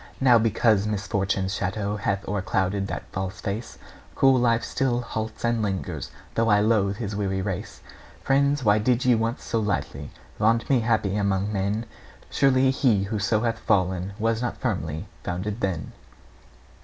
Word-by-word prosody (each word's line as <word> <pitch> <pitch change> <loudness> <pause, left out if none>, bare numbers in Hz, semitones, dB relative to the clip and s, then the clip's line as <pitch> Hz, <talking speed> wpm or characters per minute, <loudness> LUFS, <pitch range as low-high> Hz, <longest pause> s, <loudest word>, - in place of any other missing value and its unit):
Now, 125 -3 +6
because 110 -2 +2
misfortune's 100 -2 -1
shadow 100 +1 -2
Hath 100 -1 -2
o'erclouded 95 0 -1
that - - -4
false 95 +1 -4
face, 110 +3 -5 0.4
Cruel 135 -1 +5
Life 115 -1 +2
still 125 -3 0
halts 110 -1 -4
and 115 -1 +1
lingers, 95 -7 -3 0.2
Though 115 0 +1
I 105 -1 +5
loathe 105 -2 +2
his 105 -3 -4
weary 95 -2 -1
race. 95 -3 -5 0.4
Friends, 140 +1 +2
why 105 -1 +4
did 125 +3 +1
ye 125 - +5
once 115 +2 -1
so 115 - -1
lightly 85 -9 -2 0.3
Vaunt 115 +2 +2
me 130 - +5
happy 110 -4 +1
among 100 0 0
men? 100 +3 -1 0.5
Surely 130 -1 +3
he 120 -8 +2
who 105 +2 -2
so 105 +1 +1
hath 115 -1 -1
fallen 95 0 0
Was 115 +1 0
not 120 - -2
firmly 80 +3 -3 0.2
founded 100 +4 -4
then. 85 -6 -2
105 Hz, 155 wpm, -25 LUFS, 95-115 Hz, 0.5 s, Now